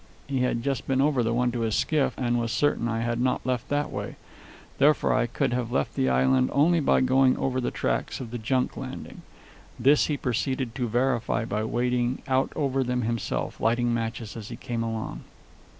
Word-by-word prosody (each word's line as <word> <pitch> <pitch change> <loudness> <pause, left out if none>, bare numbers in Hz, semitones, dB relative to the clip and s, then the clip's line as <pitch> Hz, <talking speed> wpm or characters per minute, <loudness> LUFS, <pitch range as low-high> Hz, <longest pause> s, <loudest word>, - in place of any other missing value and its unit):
He 135 -2 -2
had 125 -2 0
just 135 0 -2
been 135 -1 +1
over 140 -2 +3
the 115 0 0
one 120 +1 +1
to 120 - -3
his 115 -2 0
skiff, 150 -3 +1
and 120 -2 0
was 115 -1 -2
certain 145 -4 +1
I 115 0 -1
had 120 0 -1
not 130 0 0
left 125 -2 -2
that 145 0 0
way. - - -5 0.6
Therefore 150 +2 +4
I - - +2
could 120 - -1
have 120 -1 -2
left 70 - 0
the 65 - +1
island 65 0 +3
only 165 +4 +4
by 145 - +3
going 130 0 +4
over 130 -1 -1
the 120 - 0
tracks - - -2
of 120 -3 -7
the 120 - -4
junk 125 +3 0
landing. - - -7 0.6
This 140 +5 +4
he 150 - -1
proceeded 130 0 -1
to 125 -1 -2
verify 120 -1 0
by 110 -1 -2
wading 125 +2 0
out 130 0 +1
over 135 -2 0
them 125 -1 -1
himself, 115 0 -2
lighting 120 +1 +2
matches 115 -1 -3
as 110 -2 -7
he 120 - -6
came 115 0 -4
along. 115 -1 -4
120 Hz, 200 wpm, -26 LUFS, 115-130 Hz, 0.6 s, Therefore